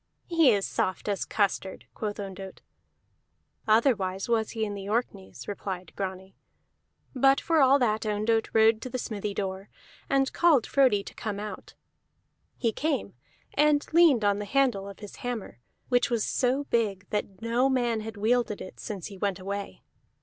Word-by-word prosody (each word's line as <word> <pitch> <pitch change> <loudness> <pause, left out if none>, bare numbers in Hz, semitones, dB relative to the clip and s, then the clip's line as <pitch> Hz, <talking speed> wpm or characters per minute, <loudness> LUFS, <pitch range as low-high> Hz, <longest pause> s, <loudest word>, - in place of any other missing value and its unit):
"He 330 -5 +5
is 200 -3 +1
soft 185 +2 -2
as 200 -2 -1
custard," 195 -2 -1
quoth 210 -2 -4
Ondott. 195 -1 -7 1.1
"Otherwise 215 -5 +2
was 225 -2 +1
he 220 -1 -2
in 205 - -4
the 200 0 -6
Orkneys," 210 -4 -3
replied 190 -2 -5
Grani. 190 -1 -5 0.8
But 270 +1 +4
for 325 -2 +2
all 270 +1 +6
that 220 -5 +1
Ondott 215 +1 0
rode 220 0 +4
to 255 - -5
the 255 - -3
smithy 210 -4 -4
door, 190 0 -4 0.4
and 270 -1 +2
called 320 -9 +4
Frodi 255 -8 +3
to - - -10
come 205 -2 -4
out. 210 0 -8 0.8
He 230 - +1
came, 295 +5 -2 0.4
and 295 0 +3
leaned 315 -10 +5
on 205 0 +2
the 210 - -4
handle 220 -4 +1
of 200 - -12
his 205 - -9
hammer, 240 - -5 0.3
which 245 +2 +3
was 235 -3 0
so 260 +3 +1
big 205 -7 -1
that 200 -2 -3
no 240 +3 +2
man 240 -4 +1
had 220 0 -7
wielded 220 0 +1
it 185 - -10
since 200 -6 -6
he 195 -3 -9
went 200 -2 0
away. 200 +1 -6
215 Hz, 165 wpm, -27 LUFS, 200-250 Hz, 1.1 s, all